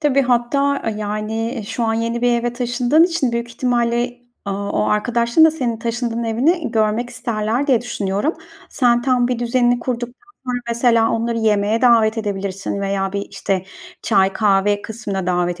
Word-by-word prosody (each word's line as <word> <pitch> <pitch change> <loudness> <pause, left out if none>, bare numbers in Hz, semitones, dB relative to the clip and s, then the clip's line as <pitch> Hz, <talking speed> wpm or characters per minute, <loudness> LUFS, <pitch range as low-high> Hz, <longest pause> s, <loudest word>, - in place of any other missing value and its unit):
Tabii, 275 -3 +3
hatta, 270 +3 +1
yani, 215 +3 -3
şu 235 - -3
an 225 - +1
yeni 230 +1 -2
bir 245 - +3
eve 240 0 -2
taşındığın 245 +5 +2
için 330 -8 0
büyük 235 0 -2
ihtimalle, 240 0 0 0.3
aaa, 200 0 -3
o - - +1
arkadaşın 235 +6 +3
da 320 - +6
senin 250 -7 -2
taşındığın 235 0 -3
evini 275 +8 +1
görmek 225 +2 0
isterler 235 +1 -2
diye 255 -6 +3
düşünüyorum. 210 - -2 0.4
Sen 240 -2 +2
tam 250 -1 +2
bir 250 -2 -1
düzenini 240 0 +2
kurduktan 245 - -5 0.2
sonra, 250 -1 -2
mesela, 235 -1 +3
onları 230 0 -1
yemeğe 215 0 +1
davet 230 -2 +4
edebilirsin 200 -2 -3
veya 195 -1 -1
bir 200 0 -3
işte 190 -2 -2 0.4
çay, 190 0 +2
kahve 205 0 +2
kısmına 205 -4 -5
davet 175 -1 0
235 Hz, 160 wpm, -19 LUFS, 210-245 Hz, 0.4 s, da